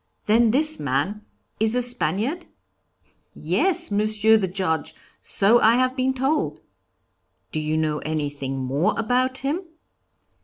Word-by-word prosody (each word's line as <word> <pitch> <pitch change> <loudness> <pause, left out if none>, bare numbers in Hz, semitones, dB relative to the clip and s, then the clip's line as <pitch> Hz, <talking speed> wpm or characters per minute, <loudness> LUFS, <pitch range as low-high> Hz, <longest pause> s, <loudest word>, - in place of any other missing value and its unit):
'Then 225 +2 +4
this 305 +6 +2
man 145 +10 -2 0.4
is 220 +2 +1
a 250 - +2
Spaniard?' 245 - -1 0.9
'Yes, 355 - 0
Monsieur 215 +1 +2
the 205 -4 +1
Judge, 175 -3 -2 0.2
so 220 +4 +3
I 225 +2 +5
have 255 +1 +1
been 260 0 0
told.' 270 +4 -1 0.9
'Do 155 - -2
you 155 +1 -2
know 155 -1 -1
anything 145 -3 -4
more 135 +5 -1
about 255 +3 0
him?' 305 +7 -1
215 Hz, 125 wpm, -23 LUFS, 155-255 Hz, 0.9 s, I